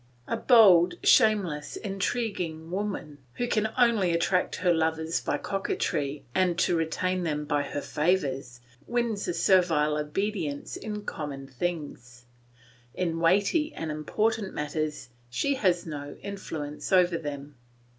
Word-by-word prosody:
A - - -1
bold, 190 -8 +6
shameless, 190 -9 +3
intriguing 195 -5 -3
woman, 185 -7 -4 0.2
who 245 - -1
can 220 -2 +1
only 230 -7 +3
attract 180 +2 +1
her 180 -2 +2
lovers 160 0 0
by - - -1
coquetry 150 -7 -2
and 180 -2 +2
retain 175 +2 0
them 150 -3 -2
by 145 -1 +1
her 145 - -4
favours, 135 -7 -1 0.3
wins 235 -4 -1
a 175 - 0
servile 165 -6 +3
obedience 150 0 -3
in 210 -1 -5
common 140 -3 -5
things; 135 -4 -5 0.7
in 165 -2 -1
weighty 205 - +2
and 160 -1 -4
important 210 +7 -1
matters 150 -2 -3 0.2
she 280 - 0
has 185 -9 +1
no 145 -3 -6
influence 160 -7 -6
over 180 -2 +4
them. 145 -2 -6
170 Hz, 125 wpm, -27 LUFS, 150-200 Hz, 0.7 s, bold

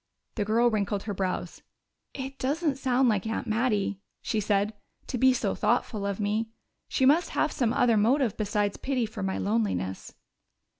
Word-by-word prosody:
The 210 - -1
girl 230 +3 +3
wrinkled 205 -2 -1
her 205 - -3
brows. 185 -2 -3 0.5
"It 270 0 -6
doesn't 290 +1 0
sound 260 -1 +2
like 215 -2 +1
Aunt 225 - -2
Mattie," 215 -3 0 0.2
she 220 - 0
said, 205 0 +1 0.3
"to 250 - -4
be 260 +1 +6
so 235 -6 0
thoughtful 210 -2 0
of 200 0 -3
me. 215 +2 0 0.4
She 265 - +1
must 310 +6 +4
have 310 - +2
some 245 -6 0
other 235 -2 +3
motive 235 +2 +2
besides 205 -1 -1
pity 260 -3 -1
for 215 - -7
my 95 0 -1
loneliness." 95 -2 -2
215 Hz, 165 wpm, -27 LUFS, 200-255 Hz, 0.5 s, be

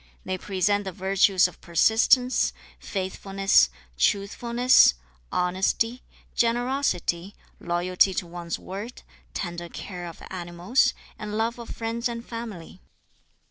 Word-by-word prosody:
They 185 - -1
present 205 +2 0
the 190 - -3
virtues 190 0 +3
of 180 - -15
persistence, 230 - +3 0.3
faithfulness, 195 - +1 0.3
truthfulness, 235 - +4 0.4
honesty, 190 +7 0 0.3
generosity, 235 -7 0 0.2
loyalty 180 +2 +2
to - - -1
one's 170 0 -5
word, 205 +6 -8 0.3
tender 175 -2 -4
care 180 -1 -7
of 165 - -11
animals, 180 +8 +1 0.2
and 210 0 -4
love 230 +2 -1
of 235 - -9
friends 230 +1 -2
and 235 0 -6
family. 215 -7 -8
195 Hz, 105 wpm, -25 LUFS, 180-230 Hz, 0.4 s, truthfulness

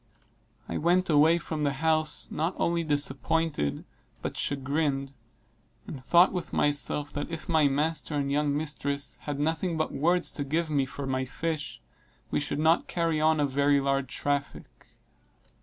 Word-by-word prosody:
I - - -3
went 175 +2 +2
away 155 +3 +5
from 160 -3 -4
the 140 -1 +1
house 155 +1 0
not 165 +4 -1
only 170 0 +1
disappointed 145 - 0 0.4
but - - -3
chagrined, 140 0 -1 0.7
and 130 -3 -8
thought 175 +8 +5
with 180 - -4
myself 145 0 +1
that 145 - -4
if 165 -1 -6
my 160 -3 +4
master 150 +2 -1
and 140 -1 -1
young 145 0 +1
mistresses 145 -2 -2
had 145 -1 -3
nothing 160 +3 0
but 155 - -1
words 175 +5 +2
to 145 - -3
give 155 +3 -1
me 140 -3 +1
for 140 0 -6
my 130 -1 -1
fish, 150 +3 -4 0.5
we - - +1
should 145 - -2
not 160 +3 +3
carry 165 -3 0
on 155 0 +3
a 145 - +3
very 140 +1 +2
large 135 -1 -1
traffic. 145 -1 -3
150 Hz, 155 wpm, -28 LUFS, 140-160 Hz, 0.7 s, away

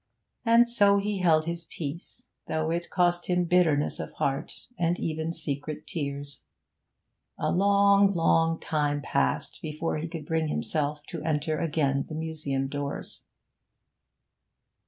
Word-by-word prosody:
And 235 0 +5
so 205 -4 +4
he 200 0 -1
held 160 -3 +3
his 170 0 -3
peace, 165 - -7 0.2
though 160 0 -1
it 170 +1 -2
cost 175 -1 +1
him 180 -1 +2
bitterness 165 -4 +2
of - - -6
heart 135 0 -3
and 170 0 0
even 160 0 -2
secret 150 -2 -4
tears. 140 -3 -4 1.0
A - - 0
long, 200 +1 +5
long 165 -1 +3
time 145 -2 -1
passed 65 - 0
before 155 +1 -3
he 155 +2 -3
could 165 -3 -7
bring 160 0 0
himself 150 -1 -1
to 165 - -6
enter 155 0 -1
again 145 -4 0
the 155 - -5
museum 155 -4 -2
doors. 140 0 -5
160 Hz, 135 wpm, -27 LUFS, 150-175 Hz, 1.0 s, And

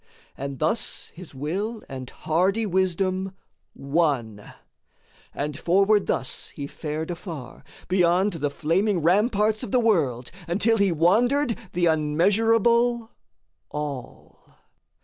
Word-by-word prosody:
And 140 0 -5
thus 160 - -2
his 170 -4 -12
will 195 - -3
and 130 -2 -7
hardy 190 +7 0
wisdom 190 0 0 0.4
won; 135 -8 -1 0.8
And 145 0 -4
forward 195 +6 +3
thus 130 - -3
he 140 - -5
fared 155 +3 -5
afar, 165 -7 -8 0.2
beyond 180 +2 +3
The 145 -3 -1
flaming 170 +5 0
ramparts 210 +4 +2
of - - -4
the 250 - +3
world, 150 - +1 0.2
until 215 +6 +2
He 200 -3 +3
wandered 230 - +3 0.2
the 175 0 +1
unmeasurable 225 +9 +2 0.6
All. 145 -4 -7
180 Hz, 110 wpm, -25 LUFS, 150-210 Hz, 0.8 s, forward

